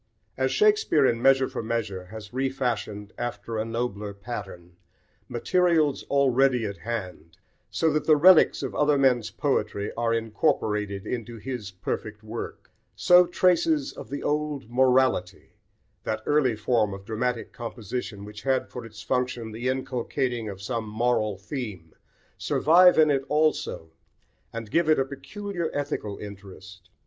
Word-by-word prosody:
As 130 0 0
Shakespeare 420 - +3
in 115 -2 +1
Measure 135 0 +4
for - - -5
Measure 110 -5 -3
has 105 +2 -10
refashioned, 120 -6 -2
after 115 -2 -4
a 110 - -1
nobler 115 -3 -3
pattern, 95 -5 -8 0.5
materials 155 +3 +1
already 135 -3 +3
at 100 -1 -5
hand, 90 -5 -6 0.3
so 160 -2 +1
that 155 - 0
the 155 - +7
relics 170 +3 +6
of - - -3
other 150 -1 +3
men's 125 -5 +3
poetry 105 -7 -1
are 115 0 0
incorporated 105 -4 0
into 120 -1 -5
his 120 -3 -5
perfect 105 +3 -5
work, 110 +2 -7 0.2
so 180 0 +6
traces 170 -5 +2
of - - -10
the 140 - -5
old 150 -5 -2
"morality," 125 -7 +2 0.5
that 110 0 -3
early 145 -6 +2
form 105 -2 +1
of 95 0 -12
dramatic 115 +2 -2
composition 115 -2 -6
which 105 0 -10
had 130 +3 0
for 125 - -7
its 115 -1 -11
function 125 -3 -2
the 120 +4 -3
inculcating 125 -2 -2
of 100 -1 -8
some 115 -1 -3
moral 110 -2 0
theme, 100 - -7 0.5
survive 180 +4 +5
in 155 -1 +6
it 135 -1 +1
also, 150 - 0 0.6
and 115 -2 -7
give 165 -1 +2
it 155 - +5
a 135 - +2
peculiar 170 +5 -5
ethical 140 -8 -3
interest. 95 -2 -11
120 Hz, 140 wpm, -26 LUFS, 105-140 Hz, 0.6 s, the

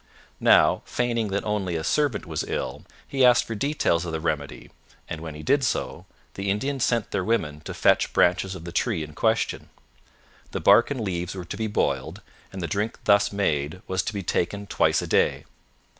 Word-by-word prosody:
Now, - - +5
feigning 120 -2 -1
that 100 0 -2
only 100 -5 -2
a 80 - -2
servant 140 - 0
was 80 -3 -3
ill, - - -4 0.2
he 135 -1 +1
asked 125 -1 +6
for 115 - -5
details 110 - 0
of 85 - -4
the 80 - -2
remedy, 75 -3 -4 0.4
and, 80 -2 -6
when 80 -2 -7
he 75 - -9
did 140 +2 +2
so, 120 - -2 0.3
the 100 0 -3
Indians 135 +6 -1
sent 115 -4 0
their 95 - -1
women 75 -9 -1
to - - -5
fetch - - +3
branches 95 +2 +2
of 85 -2 -9
the 85 - -6
tree 100 -4 0
in 75 0 -9
question. - - 0 0.8
The - - -1
bark 120 - +5
and 140 -4 -3
leaves 90 -2 -3
were 90 -2 -6
to - - -6
be 110 - -2
boiled, 70 -10 -1 0.3
and 95 -2 -6
the - - -1
drink 105 +5 -2
thus 100 -1 +4
made 80 -4 -1
was 95 0 0
to 105 - -4
be 100 - -3
taken 100 +4 -1
twice - - +1
a - - -5
day. - - +1
100 Hz, 200 wpm, -25 LUFS, 85-115 Hz, 0.8 s, asked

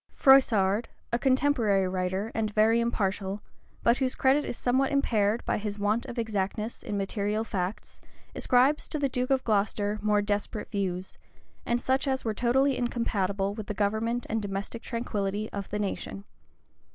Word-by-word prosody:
Froissard,[] 225 -6 +5 0.3
a 235 - +2
contemporary 255 -8 +2
writer, 185 +3 -2
and 220 -1 0
very 220 +2 +4
impartial, 205 -3 -1 0.4
but 235 +1 +4
whose 260 -2 0
credit 270 +3 +3
is - - -5
somewhat 260 +2 +1
impaired 225 -6 +1
by - - 0
his 210 -1 -4
want 210 +3 0
of 240 - -7
exactness 215 0 -2
in 205 - -4
material 205 +2 -1
facts, 190 -2 -4 0.3
ascribes 260 +4 +3
to - - -2
the 285 -1 +1
duke 250 0 -2
of 265 -1 +2
Glocester 210 -1 0
more 210 -1 +2
desperate 205 +1 -2
views, 190 -3 -3 0.5
and 240 0 +1
such 265 +3 0
as 265 -2 -1
were 220 - 0
totally 260 +5 +2
incompatible 200 -5 -1
with 215 -1 -7
the 210 - -4
government 220 +4 0
and 225 0 -1
domestic 200 +3 -4
tranquillity 215 -4 -3
of 200 -1 -5
the 210 - -2
nation. 200 -1 -4
215 Hz, 160 wpm, -28 LUFS, 200-245 Hz, 0.5 s, Froissard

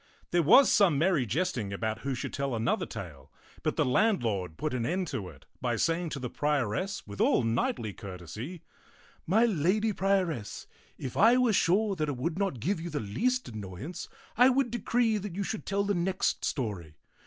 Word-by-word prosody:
There 175 - +3
was 250 - +7
some 190 -8 +4
merry 155 -5 +2
jest 145 - 0
ing 100 -3 -4
about 110 +2 -2
who 135 -1 -3
should 125 - -5
tell 140 -3 -2
another 115 +1 0
tale, - - -9 0.3
but - - -1
the - - +2
landlord 115 - +1
put 155 -2 -2
an 125 -2 -1
end 180 +7 -1
to 95 -4 -4
it - - -16 0.2
by 120 -2 0
saying 165 +7 0
to 150 - -4
the 125 - -3
prioress 150 - -1
with 100 0 -6
all - - +3
knightly 115 -1 -1
courtesy, 105 - -8 0.3
" - - -28 0.3
My 220 +8 +4
lady 210 +2 +1
prioress, 185 - -1 0.3
if 130 - -6
I 230 +4 +6
were 250 -3 +3
sure 195 +3 +2
that 155 -2 -1
it 140 - -3
would 165 +7 -2
not 195 -11 -1
give 170 - -1
you 175 - -5
the 150 -2 -2
least 245 - -1
annoyance, 110 - -7 0.3
I 250 +3 +6
would 260 -2 +1
decree 235 -1 +1
that 195 -3 -6
you 200 - -1
should 215 - -5
tell 200 +1 +1
the 205 0 0
next 185 +1 0
story. 100 - -3
160 Hz, 195 wpm, -29 LUFS, -, 0.3 s, was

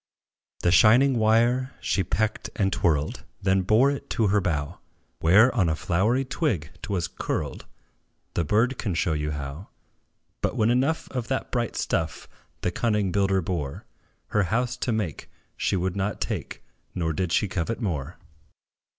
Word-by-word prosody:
The 85 - +3
shining 120 +7 +5
wire 120 +3 +2
she 95 - 0
pecked 110 +5 -1
and 95 -4 +1
twirled; 75 -4 0 0.2
Then 95 0 +2
bore 110 +9 +4
it 140 - -6
to 110 -3 +1
her 100 +1 +3
bough, 75 -6 -2 0.4
Where, 105 +10 +5
on 95 -9 +2
a 80 - +1
flowery 105 +12 +1
twig 100 - -1
't - - -6
was 90 -4 0
curled - - -4 0.7
The 85 - 0
bird 115 - +1
can 100 -6 -2
show 80 0 +1
you 75 0 -1
how: 75 +4 -6 0.7
But, - - 0
when 110 +2 +3
enough 135 +6 +1
of 125 -3 -3
that 135 +1 -2
bright 120 -2 -1
stuff 80 -1 -2 0.3
The 90 - 0
cunning 105 -2 0
builder 95 0 +2
bore 80 -6 -4 0.4
Her 105 - +2
house 120 +7 0
to 125 - -1
make, 105 -9 -3 0.3
she - - 0
would 95 0 -1
not 100 +1 -2
take, - - -4 0.3
Nor 80 -3 -1
did 90 +1 -2
she 105 - +2
covet 95 +4 -2
more. 85 - -3
100 Hz, 160 wpm, -25 LUFS, 85-115 Hz, 0.7 s, shining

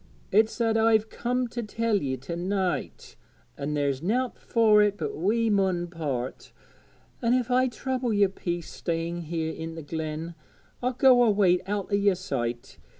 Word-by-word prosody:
It's 220 +2 +3
that 225 -1 +2
I've 220 -1 +3
comed 250 0 -1
to 240 - -3
tell 225 0 0
ye 135 -7 -2
to 135 +7 -6
night; 185 +1 -3 0.4
an' 150 +1 -3
there's 140 -2 0
nowt 245 +8 0
fur 220 -2 +4
it 205 -1 +2
but 150 -3 -3
we 220 +7 +1
mun 190 -3 +1
part. 140 -7 -4 0.7
An' 240 0 +3
if 250 -1 -1
I 255 +1 +4
trouble 255 0 -2
yer 205 -1 +4
peace 175 -3 -4
staying 170 +1 -3
here 160 0 -2
i' 165 0 -6
the 165 - -7
glen, 160 +2 -4 0.5
I'll 250 +1 0
go 250 0 +5
away 200 -6 +4
out 205 0 -3
o' - - +3
yer 200 -1 +3
sight. 120 -9 -4
195 Hz, 165 wpm, -27 LUFS, 165-230 Hz, 0.7 s, go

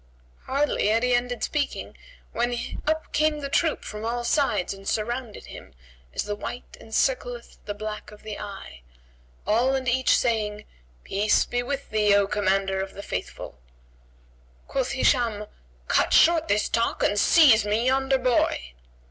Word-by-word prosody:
Hardly 280 -4 0
had 225 +2 +2
he 250 0 +2
ended 245 0 -1
speaking, 295 -2 -2 0.4
when 240 +1 -1 0.3
up 315 +1 -1
came 305 0 +2
the 280 - -4
troop 320 +3 +1
from 210 0 -7
all 240 +1 -2
sides 240 - +1
and 195 0 -6
surrounded 235 +1 -3
him - - -12 0.4
as - - -2
the 210 - -3
white 245 +4 -7
encircleth 245 +1 -2
the 205 - -4
black 215 0 -6
of 210 0 -15
the 215 -1 -6
eye, 195 - -9 0.6
all 245 +5 +2
and 260 -1 -3
each 255 +2 +3
saying, 215 -3 -1 0.4
"Peace 205 +2 +2
be 245 - -1
with 275 +3 -5
thee, 210 -2 +3
O 200 0 +4
Commander 195 -1 0
of 190 0 -6
the 200 - -7
Faithful!" 90 - -6 1.1
Quoth 265 -2 -1
Hisham, 235 -6 +1 0.4
"Cut - - +2
short 330 -1 +5
this 210 +1 +1
talk 230 0 0
and 205 - +2
seize 250 -6 +6
me 210 +3 0
yonder 270 +1 +2
boy." 240 - 0
230 Hz, 155 wpm, -25 LUFS, 210-260 Hz, 1.1 s, seize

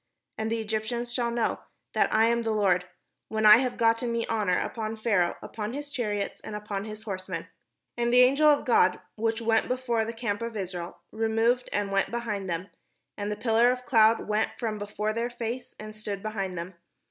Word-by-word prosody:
And 220 0 -3
the 225 -1 -1
Egj'ptians 220 +3 -2
shall 240 -1 0
know 235 -1 0 0.3
that - - +2
I 220 +1 +4
am 235 +1 +2
the 225 - -2
Lord, 190 -4 +2 0.4
when 220 0 0
I 210 0 +10
have 250 0 -1
gotten 230 +1 +2
me 235 0 -1
honour 210 -5 +1
upon 220 -1 -3
Pharaoh, 205 -6 +1
upon 215 +1 -5
his 290 +1 -6
chariots, 210 -7 -2
and 215 - -7
upon 210 -1 -4
his 215 0 -8
horsemen." 190 -4 -5 0.5
And 235 0 0
the 250 +1 +7
angel 275 +5 +5
of 295 -1 +4
God, 190 -7 +4 0.2
which 225 +1 -1
went 225 0 +2
before 250 -3 0
the 225 - -3
camp 225 -2 -3
of 230 -1 -4
Israel, 180 -2 -5
removed 225 +3 +1
and 205 -1 -1
went 195 0 +1
behind 210 -5 -3
them; 175 +3 -3 0.5
and 205 0 -3
the - - -1
pillar 225 +2 +3
of 250 0 -3
the - - -21
cloud 225 -3 +4
went 215 +1 +1
from 220 -3 -3
before 210 +1 -2
their 230 +2 -1
face, 240 +1 -5
and 215 0 -8
stood 205 -2 -5
behind 195 -4 -3
them. 170 +3 -5
220 Hz, 200 wpm, -27 LUFS, 210-235 Hz, 0.5 s, I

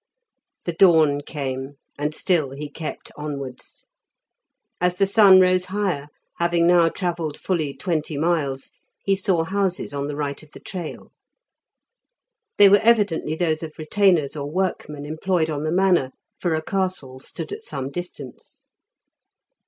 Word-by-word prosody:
The 175 - -2
dawn 160 -5 +5
came, 135 -1 -5 0.2
and 150 +1 -1
still 165 -7 +1
he 145 +1 -7
kept 155 +1 -7
onwards. 140 -4 -7 0.9
As 180 0 +1
the 195 - +3
sun 195 -1 +7
rose 185 0 +4
higher, 190 -8 -2 0.3
having 170 0 +2
now 170 -1 +5
travelled 170 -4 -3
fully 155 -7 -2
twenty 160 -4 -2
miles, 145 -4 -1 0.3
he 195 - +3
saw 190 -3 +1
houses 190 -3 -1
on 140 0 -2
the 145 - -4
right 145 -1 -3
of 155 -1 -18
the - - -11
trail. 175 -4 -7 1.5
They 205 - +9
were 200 +1 +6
evidently 205 -9 +2
those 160 -2 0
of 155 -2 -8
retainers 160 -3 +2
or 145 -1 -4
workmen 150 -4 -2
employed 160 +1 0
on 150 0 -3
the 155 - 0
manor, 175 -7 +2 0.3
for 170 -3 0
a 155 - -2
castle 185 -9 -3
stood 135 - -7
at 430 +2 -6
some 135 - -4
distance. 150 -6 -8
165 Hz, 145 wpm, -23 LUFS, 145-185 Hz, 1.5 s, They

